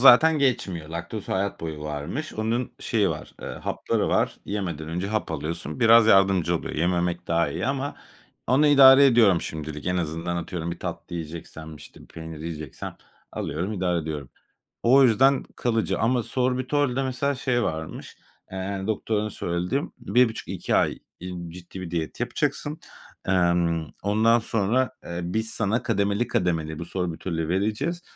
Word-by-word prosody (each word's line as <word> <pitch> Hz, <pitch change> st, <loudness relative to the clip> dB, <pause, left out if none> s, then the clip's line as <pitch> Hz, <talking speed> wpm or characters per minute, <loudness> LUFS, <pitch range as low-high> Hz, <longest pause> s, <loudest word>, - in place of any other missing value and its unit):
zaten 155 Hz, +5 st, +8 dB
geçmiyor. 95 Hz, -, 0 dB
Laktoz 85 Hz, +6 st, -6 dB
hayat 100 Hz, +1 st, -1 dB
boyu 80 Hz, -2 st, -5 dB
varmış. 75 Hz, -, -4 dB
Onun 115 Hz, +3 st, -1 dB
şeyi 105 Hz, -5 st, +1 dB
var, 75 Hz, -, -7 dB
eee, -, -, -5 dB
hapları -, -, -2 dB
var. -, -, +1 dB
Yemeden 85 Hz, -7 st, -4 dB
önce 90 Hz, +4 st, -2 dB
hap 110 Hz, -3 st, -2 dB
alıyorsun. 80 Hz, 0 st, -4 dB
Biraz 115 Hz, -1 st, +7 dB
yardımcı 95 Hz, -4 st, +4 dB
oluyor. -, -, -6 dB
Yememek 85 Hz, +1 st, 0 dB
daha 85 Hz, -1 st, +2 dB
iyi 70 Hz, -, -3 dB
ama 140 Hz, +1 st, -2 dB, 0.5 s
onu 135 Hz, +5 st, +4 dB
idare 140 Hz, -1 st, +8 dB
ediyorum 110 Hz, -9 st, +5 dB
şimdilik. 75 Hz, -1 st, -6 dB
En 90 Hz, 0 st, +1 dB
azından 85 Hz, +1 st, -2 dB
atıyorum, 85 Hz, -1 st, -4 dB
bir 85 Hz, -, -5 dB
tatlı -, -, -6 dB
yiyeceksem, 80 Hz, -1 st, -7 dB
işte, -, -, -14 dB
bir -, -, -14 dB
peynir 80 Hz, -1 st, -9 dB
yiyeceksem 80 Hz, -3 st, -6 dB, 0.4 s
alıyorum, 85 Hz, +8 st, -3 dB
idare 90 Hz, -3 st, 0 dB
ediyorum. 75 Hz, -4 st, -5 dB, 0.5 s
O 135 Hz, +4 st, +6 dB
yüzden 130 Hz, +3 st, +4 dB
kalıcı 115 Hz, -2 st, 0 dB
ama 120 Hz, +1 st, +2 dB
sorbitolde 130 Hz, +2 st, 0 dB
mesela 135 Hz, +2 st, -1 dB
şey 125 Hz, -2 st, 0 dB
varmış, 80 Hz, 0 st, -5 dB, 0.3 s
eee, 95 Hz, +1 st, -3 dB
doktorun 110 Hz, 0 st, -1 dB
söylediği; 90 Hz, +8 st, -1 dB, 0.2 s
"1.5-2 120 Hz, -2 st, +1 dB
ay, -, -, +2 dB, 0.2 s
iii, 90 Hz, -1 st, -6 dB
ciddi 90 Hz, +2 st, -9 dB
bir 85 Hz, -, -6 dB
diyet 80 Hz, -2 st, -3 dB
yapacaksın. 145 Hz, +5 st, -2 dB, 0.5 s
Emm, 85 Hz, -3 st, +2 dB, 0.2 s
ondan 110 Hz, +3 st, +4 dB
sonra, 115 Hz, +4 st, +1 dB
eee, 85 Hz, 0 st, -5 dB
biz 110 Hz, +6 st, -1 dB
sana 115 Hz, +2 st, 0 dB
kademeli 100 Hz, 0 st, +1 dB
kademeli 80 Hz, -7 st, -1 dB
bu 85 Hz, -, -5 dB
sorbitolü 85 Hz, -2 st, -3 dB
vereceğiz 110 Hz, -, -1 dB
95 Hz, 145 wpm, -25 LUFS, 85-120 Hz, 0.5 s, zaten